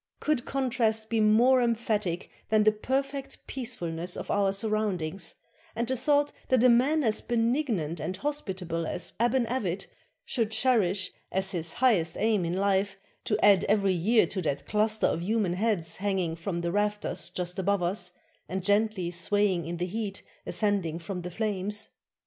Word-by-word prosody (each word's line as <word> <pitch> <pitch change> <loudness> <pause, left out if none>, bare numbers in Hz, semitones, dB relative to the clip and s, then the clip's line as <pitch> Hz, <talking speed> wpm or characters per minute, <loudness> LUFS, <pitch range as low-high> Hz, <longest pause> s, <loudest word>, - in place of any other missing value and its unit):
Could 300 -5 0
contrast 225 -5 0
be 225 - +2
more 235 +5 +5
emphatic 215 -6 -1 0.2
than 215 -1 +4
the 215 - +6
perfect 270 +5 -3
peacefulness 180 -9 -3
of - - -4
our 200 -1 +2
surroundings, 195 -5 -1 0.4
and 235 +1 -1
the 260 - 0
thought 290 +3 +2 0.2
that 255 -2 +3
a 255 - +7
man 275 +6 +4
as 220 -3 +1
benignant 230 - 0
and 185 +4 -3
hospitable 185 - -3
as 175 - -2
Aban 240 +1 +2
Avit 195 -7 -2 0.4
should 230 -5 0
cherish 215 -5 +2 0.2
as 190 +1 -1
his 170 -3 -3
highest 195 -11 +2
aim 215 -4 +2
in 170 +2 -1
life 195 0 +1 0.3
to 210 - +1
add 200 -2 +6
every 200 -2 +3
year 215 +7 +3
to 190 - -4
that 145 -4 -2
cluster 215 +1 +1
of 165 - +1
human 205 -1 0
heads 180 -5 0
hanging 190 -4 -1
from 170 +1 -3
the 170 0 -1
rafters 205 -2 -1
just 180 +1 -4
above 195 0 +1
us, 180 0 -1 0.4
and 190 0 -3
gently 205 -3 +1
swaying 180 0 +1
in 170 0 -4
the 175 - -1
heat 200 +1 -4 0.2
ascending 200 -7 0
from 180 +2 -5
the 180 - -5
flames? 205 +1 -2
205 Hz, 160 wpm, -28 LUFS, 180-230 Hz, 0.4 s, a